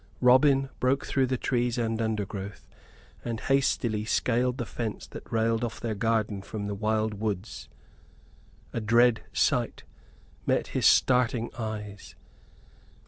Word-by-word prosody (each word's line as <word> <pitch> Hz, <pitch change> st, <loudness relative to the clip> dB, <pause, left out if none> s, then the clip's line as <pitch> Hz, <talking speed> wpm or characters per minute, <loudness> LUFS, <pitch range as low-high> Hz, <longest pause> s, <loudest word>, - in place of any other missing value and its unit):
Robin 135 Hz, +2 st, +5 dB
broke 130 Hz, +2 st, +1 dB
through 135 Hz, -2 st, +1 dB
the 130 Hz, 0 st, 0 dB
trees 120 Hz, 0 st, 0 dB
and 115 Hz, -1 st, -1 dB
undergrowth 105 Hz, -2 st, -4 dB, 0.6 s
and 115 Hz, -2 st, -3 dB
hastily 130 Hz, -5 st, +1 dB
scaled 125 Hz, +3 st, +1 dB
the 120 Hz, -, -3 dB
fence 110 Hz, -1 st, -5 dB
that -, -, -11 dB
railed 115 Hz, +1 st, +1 dB
off 120 Hz, -, -3 dB
their 115 Hz, -2 st, -2 dB
garden 110 Hz, -1 st, 0 dB
from 100 Hz, +1 st, -6 dB
the 100 Hz, -, -3 dB
wild 110 Hz, +1 st, 0 dB
woods. 105 Hz, -1 st, -4 dB, 1.0 s
A 115 Hz, -, -2 dB
dread 115 Hz, +1 st, +4 dB
sight -, -, 0 dB, 0.6 s
met -, -, +1 dB
his -, -, +2 dB
starting 125 Hz, -2 st, +3 dB
eyes. 105 Hz, -3 st, -6 dB
115 Hz, 130 wpm, -28 LUFS, 110-125 Hz, 1.0 s, Robin